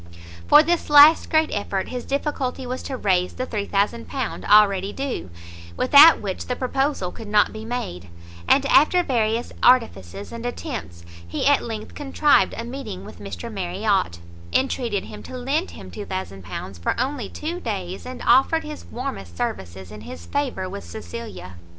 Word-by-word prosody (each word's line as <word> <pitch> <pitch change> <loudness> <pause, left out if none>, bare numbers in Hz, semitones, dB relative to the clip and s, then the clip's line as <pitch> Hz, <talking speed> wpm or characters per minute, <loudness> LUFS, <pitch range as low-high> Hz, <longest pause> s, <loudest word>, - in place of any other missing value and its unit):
For 300 - +8
this 340 0 0
last 295 +2 +8
great 315 -1 +2
effort, 200 -2 -2
his 250 -1 -5
difficulty 270 -2 -2
was 255 +1 -4
to 265 - -5
raise 185 -5 +1
the 255 - -4
£3000 220 +4 -2
already 200 -2 +5
due, 270 - -4 0.5
without 290 +5 +8
which 195 -3 -5
the 250 - -1
proposal 270 -6 -1
could 225 - -10
not 210 0 +3
be 220 0 -7
made; 90 - -5 0.4
and, 275 - +4
after 310 +6 +5
various 230 -4 0
artifices 100 - +2
and 235 0 -7
attempts, 240 - -6 0.2
he 85 - -3
at 285 0 +4
length 220 -2 -6
contrived 290 +1 +2
a 230 - -4
meeting 235 -6 -7
with - - -12
Mr 100 -4 -7
Marriot, 190 - -1 0.3
intreated 240 -6 0
him 210 - -10
to 255 - -8
lend 280 +8 -1
him - - -11
£2000 95 - -6
for 85 - -1
only 255 -4 -2
two 335 +3 -5
days, 195 - -4
and 255 0 -8
offered 320 +5 +4
his 300 -1 -8
warmest 160 - -6
services 95 0 -5
in 105 0 -10
his 85 -3 -9
favour 145 - -2
with 200 +2 -7
Cecilia. 220 - -8
225 Hz, 155 wpm, -23 LUFS, 185-270 Hz, 0.5 s, For